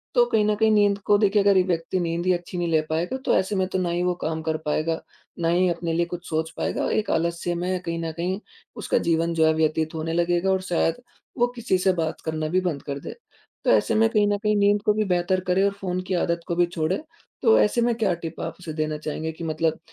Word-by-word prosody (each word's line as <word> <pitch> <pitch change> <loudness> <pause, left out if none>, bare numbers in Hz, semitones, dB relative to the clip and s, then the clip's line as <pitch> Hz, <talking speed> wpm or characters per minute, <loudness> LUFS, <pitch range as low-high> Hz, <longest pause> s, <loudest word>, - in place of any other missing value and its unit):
तो 240 - +6
कहीं 215 -3 +2
न 210 0 +2
कहीं 220 +1 +3
नींद 205 -1 +4
को 205 - +5
देखिए 205 0 +3
अगर 200 -1 +4
ये 185 - +5
व्यक्ति 175 0 -1
नींद 170 0 -2
ही 185 - +4
अच्छी 175 +1 -5
नहीं 175 -1 -1
ले 160 -2 +3
पाएगा 170 +10 -1
तो - - +3
ऐसे 190 +2 0
में 190 -1 +1
तो - - +2
ना 180 -1 -1
ही 175 +1 -1
वो 180 0 +1
काम 160 0 -2
कर 160 0 -1
पाएगा, 155 +2 0 0.4
ना 165 - 0
ही 180 +2 +3
अपने 170 -1 -2
लिए 170 +1 +1
कुछ 175 +1 -7
सोच 160 0 -1
पाएगा - - -1
और - - -1
एक 215 - 0
आलस्य 170 +1 -1
में 180 +2 -1
कहीं 170 -1 -3
न 165 - -2
कहीं 185 +3 -2 0.4
उसका - - +1
जीवन 165 +1 +1
जो 160 -1 +3
है 160 - +4
व्यतीत 160 0 0
होने 160 +1 -3
लगेगा 175 +2 +1
और 190 0 +1
शायद 165 +5 +1 0.4
वो 240 - +3
किसी 235 -6 0
से 185 +1 +2
बात 165 -2 -3
करना 155 -1 -2
भी 185 - +3
बंद 165 -6 -2
कर 140 -1 -4
दे। - - -8 0.5
तो - - +1
ऐसे 225 - +3
में 225 +1 +4
कहीं 210 -3 +2
न 205 0 +1
कहीं 210 0 0
नींद 205 0 +3
को 210 - +4
भी 215 0 +1
बेहतर 180 0 +1
करे 185 +2 +3
और 200 - +3
फ़ोन 185 -1 -2
की 190 - -1
आदत 170 -1 0
को 170 - -1
भी 175 0 +4
छोड़े। 170 +1 -1 0.4
तो 455 - +5
ऐसे 235 +3 +2
में 240 0 +2
क्या 215 -5 +1
टिप 165 0 -6
आप 165 - -4
उसे 170 -3 -7
देना 155 0 -2
चाहेंगे 155 +1 -4
कि 160 +1 -9
मतलब 160 0 -1
175 Hz, 260 wpm, -24 LUFS, 165-195 Hz, 0.5 s, तो